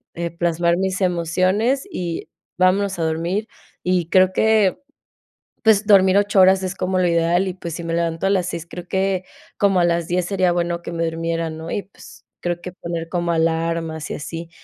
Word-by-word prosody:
eh, 170 0 -3
plasmar 170 0 +1
mis 190 +1 -1
emociones 185 - +1
y 175 - -4 0.3
vámonos 185 +1 +2
a - - 0
dormir 170 +7 -1 0.4
y 180 -2 0
creo 185 0 +4
que 220 -3 +3 0.9
pues 215 -2 +4
dormir 190 -2 +6
8 205 -1 +2
horas 190 +1 +5
es 185 0 -2
como 185 0 -1
lo 180 - +3
ideal 170 +2 +2
y 185 - -2
pues 170 -3 -6
si 170 - -6
me 165 0 -3
levanto 165 +1 -1
a - - +2
las 185 -3 +1
6, 170 -2 -5
creo 175 +1 -9
que 190 0 0 0.3
como 195 -2 +3
a 175 - +4
las 170 -1 0
10 180 0 0
sería 185 -1 +1
bueno 170 0 -1
que 170 - -7
me 170 0 -1
durmiera, 165 0 -2
¿no? 160 +1 -7
Y 200 - -2
pues 195 - -16 0.2
creo 175 0 -2
que 180 - -7
poner 170 -2 -5
como 175 -1 -1
alarmas 165 -1 -1
y - - -2
así. 165 +3 -7
175 Hz, 195 wpm, -21 LUFS, 165-190 Hz, 0.9 s, dormir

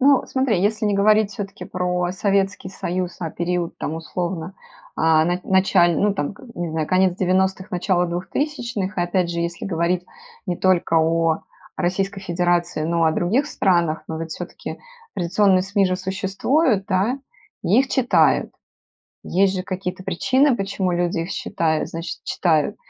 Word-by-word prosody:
Ну, 275 0 +5
смотри, 260 -8 +1
если 215 +2 +1
не 205 - +1
говорить 210 +1 +4
всё-таки 195 -2 -6
про 180 -1 -1
Советский 195 -1 0
Союз, 185 -1 -3
а 165 -2 -3
период, 175 0 -2
там, 155 - -3
условно, 170 +2 -4 0.4
а 160 0 +4
на 175 +1 0
началь 185 -3 +3
ну, 205 -1 +2
там, 170 0 -2
к - - -16
не 175 -2 -3
знаю, 160 -1 -1
конец 185 -1 +2
90- 190 +1 +1
начало 180 0 +1
2000. 210 - -3
И - - +2
опять 175 0 0
же, 170 - -2
если 170 0 -3
говорить 175 0 0 0.4
не 175 - -1
только 185 -3 +2
о 165 0 +1 0.3
Российской 195 +2 -1
Федерации, 175 -3 0
но 165 0 +1
о 160 - +3
других 225 - +1
странах, 170 - +1
но 160 0 -4
ведь 165 0 -5
всё-таки - - -7 0.4
традиционные 185 +1 +3
СМИ 200 0 +1
же 185 0 0
существуют, 195 - 0
да? 210 +7 +1 0.4
И 195 +6 +3
их 270 - -1
читают. 260 -2 +3 0.7
Есть 195 +1 +2
же 185 - -2
какие-то 185 0 -5
причины, 260 +8 +2
почему 195 -2 -1
люди 175 -1 0
их 165 - -4
считают 160 -2 -1
значит, 165 +1 -6
читают, 160 -4 +1
185 Hz, 155 wpm, -22 LUFS, 170-195 Hz, 0.7 s, Ну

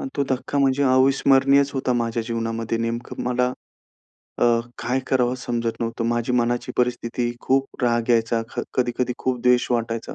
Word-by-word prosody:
अन 275 - -4
तो 140 - +1
धक्का 130 +2 -1
म्हणजे 140 0 +2
अविस्मरणीयच 135 +1 +4
होता 130 -1 0
माझ्या 115 -1 -1
जीवनामध्ये. 115 0 -3
नेमकं 115 +1 -4
मला 125 0 +1 0.9
अ, - - +6 0.3
काय 130 +2 -1
करावं 125 -1 +1
समजत 120 -2 -3
नव्हतं. 115 0 -2
माझी 120 +1 0
मनाची 120 0 0
परिस्थिती, 120 -1 -1
खूप 135 0 -1
राग 120 0 +1
यायचा. 115 0 +2
क - - -1
कधी-कधी 125 0 0
खूप 130 -1 -2
द्वेष 125 0 +4
वाटायचा. 115 -1 -2
125 Hz, 155 wpm, -23 LUFS, 115-130 Hz, 0.9 s, अ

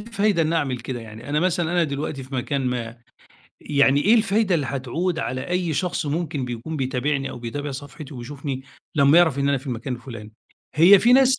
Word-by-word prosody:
فايدة 210 -5 +1
إنّي 160 +1 0
أعمل 135 -5 -1
كده، 120 0 -5
يعني 110 +2 -10
أنا 150 +1 +1
مثلًا 175 -1 0
أنا 175 -1 +3
دلوقتي 140 -1 -4
في 130 +1 -9
مكان 130 +1 -1
ما، 120 -2 -3 0.6
يعني 140 -1 +3
إيه 210 +9 +5
الفايدة 215 -3 +2
اللي 150 -5 0
هتعود 160 +7 -2
على 130 -4 -3
أي 180 -2 0
شخص 175 -2 -1
ممكن 150 -2 -2
بيكون 125 +6 -5
بيتابعني، 135 +1 -1
أو - - -8
بيتابع 145 +5 -4
صفحتي 140 +2 -8
وبيشوفني 135 +2 -5 0.3
لمّا 140 +2 +6
يعرف 160 -6 +4
إن 140 0 +1
أنا 140 -1 +2
في 135 - -14
المكان 125 0 -3
الفلاني؟ 115 -3 -9 0.4
هي 175 +6 +8
في 240 +5 +4
ناس 265 0 +5
145 Hz, 195 wpm, -23 LUFS, 130-170 Hz, 0.6 s, هي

